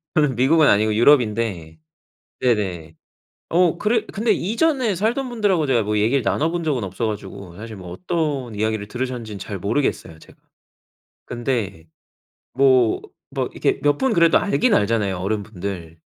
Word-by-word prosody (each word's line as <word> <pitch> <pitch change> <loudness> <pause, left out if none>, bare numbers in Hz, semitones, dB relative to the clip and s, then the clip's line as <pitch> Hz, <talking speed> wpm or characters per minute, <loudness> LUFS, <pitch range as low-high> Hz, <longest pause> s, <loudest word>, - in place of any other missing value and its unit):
저는 150 -4 +2
미국은 150 +6 +4
아니고 105 +1 +3
유럽인데. 110 - +2 0.6
네네. 95 -10 -1 0.6
어 175 -1 +3
그래 215 +1 +1
근데 225 +3 -1
이전에 235 - 0
살던 235 +8 -1
분들하고 200 -9 +1
제가 125 -4 +2
뭐 105 0 -1
얘기를 120 +6 +2
나눠본 165 +7 0
적은 135 -9 -1
없어 95 +5 -3
가지고 100 -4 -7
사실 110 +1 -8
뭐 90 -2 -10
어떤 150 - -2
이야기를 110 0 -2
들으셨는지는 120 -4 -5
잘 100 0 -6
모르겠어요, 100 - -2
제가. - - -18 0.9
근데 115 -9 -3 0.7
뭐 130 -3 +4 0.3
막 - - -3
이렇게 - - 0
몇 145 0 +2
분 265 -3 +1
그래도 170 -3 +5
알긴 230 +4 +1
알잖아요, 105 - +1
어른분들. 95 -4 -5
120 Hz, 330 characters per minute, -21 LUFS, 100-160 Hz, 0.9 s, 그래도